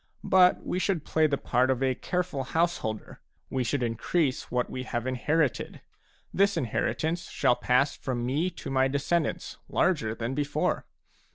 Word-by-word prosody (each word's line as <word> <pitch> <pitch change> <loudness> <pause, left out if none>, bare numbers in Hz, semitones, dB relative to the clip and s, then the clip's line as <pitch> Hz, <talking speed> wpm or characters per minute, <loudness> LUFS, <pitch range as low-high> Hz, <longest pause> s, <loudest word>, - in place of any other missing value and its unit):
But 185 -1 +4
we 180 - -1
should 185 -5 0
play 160 -1 +3
the 140 -2 0
part 125 0 +1
of 130 0 +1
a 130 -1 +2
careful 180 -1 -2
householder; 150 -8 -2 0.3
we 130 -1 0
should 125 +1 -1
increase 130 +5 0
what 125 0 0
we 130 - -5
have 120 -2 -3
inherited. 130 +2 0 0.5
This 200 -1 +3
inheritance 160 +5 -1
shall 125 -3 +2
pass 125 +3 +2
from 120 -3 -3
me 150 +8 0
to 165 -5 -8
my 130 0 +3
descendants 155 +5 -1
larger 115 -12 +1
than 115 +3 -3
before. 145 +1 -1
135 Hz, 155 wpm, -28 LUFS, 125-165 Hz, 0.5 s, But